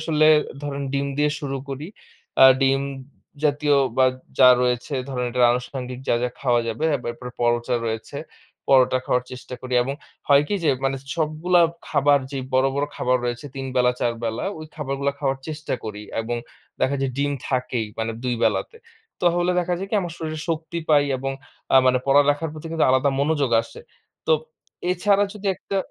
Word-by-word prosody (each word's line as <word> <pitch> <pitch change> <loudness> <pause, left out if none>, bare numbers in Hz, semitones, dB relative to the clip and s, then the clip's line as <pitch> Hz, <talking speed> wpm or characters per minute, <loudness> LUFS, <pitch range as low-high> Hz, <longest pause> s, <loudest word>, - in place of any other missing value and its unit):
আসলে 155 -1 +2 0.4
ধরেন 140 -1 -4
ডিম 140 0 0
দিয়ে 150 0 +3
শুরু 135 -2 -3
করি। 140 +3 -5 0.6
আ - - +11 0.2
ডিম 135 0 +3 0.6
জাতীয় 145 0 +2 0.2
বা 130 - +5 0.3
যা 130 - +9
রয়েছে 125 +3 -1
ধরেন 125 -2 -2
এটা 125 - -2
আনুষাঙ্গিক 125 0 -4
যা, - - +4
যা 125 - +1
খাওয়া 120 -3 +2
যাবে 115 +7 -3
এরপরে 125 -1 -5
পরোটা 120 +1 +1
রয়েছে। 110 +4 -4 0.5
পরোটা 130 -1 +5
খাওয়ার 125 0 +1
চেষ্টা 125 0 -8
করি 130 0 -3
এবং 135 +3 -3 0.3
হয় 140 0 +6
কি 205 - 0
যে 155 - +3 0.2
মানে 135 0 +1 0.2
সবগুলা 165 +3 +2 0.3
খাবার 145 -1 +4
যেই 135 -2 -4
বড়, 130 +1 +4
বড় 140 +1 +1
খাবার 125 0 +2
রয়েছে 120 +2 -3
৩ 135 - -5
তিন - - -4
বেলা 125 0 +4
৪ 120 - +1
বেলা 115 +1 -2
ওই 155 - -8
খাবারগুলা 140 -2 -2
খাওয়ার 135 -2 -1
চেষ্টা 155 -2 -3
করি 105 -1 -6 0.2
এবং 120 +1 -3 0.4
দেখা 135 +2 +2
যায় 135 -1 0
ডিম 145 0 +1 0.2
থাকেই 125 -3 -1
মানে 115 0 -1
২ 125 -1 0
বেলাতে। 460 - 0 0.4
তাহলে 175 0 +2
দেখা 180 0 0
যায় 195 - -4
কি - - -1
আমার 175 -3 -5
শরীরে 155 -1 -4
শক্তি 165 +1 -3
পাই 145 -2 +5
এবং 135 +1 -3 0.4
আ - - +9
মানে 130 0 +4
পড়ালেখার 145 +3 +3
প্রতি 155 +1 -9
কিন্তু 165 - +2
আলাদা 130 +2 +3
মনোযোগ 145 -3 +1
আসে। 115 - -12 0.5
তো - - +4 0.6
এছাড়া 200 +3 +3
যদি 210 -1 -7
একটা। 195 - -5
135 Hz, 180 wpm, -23 LUFS, 125-155 Hz, 0.6 s, আ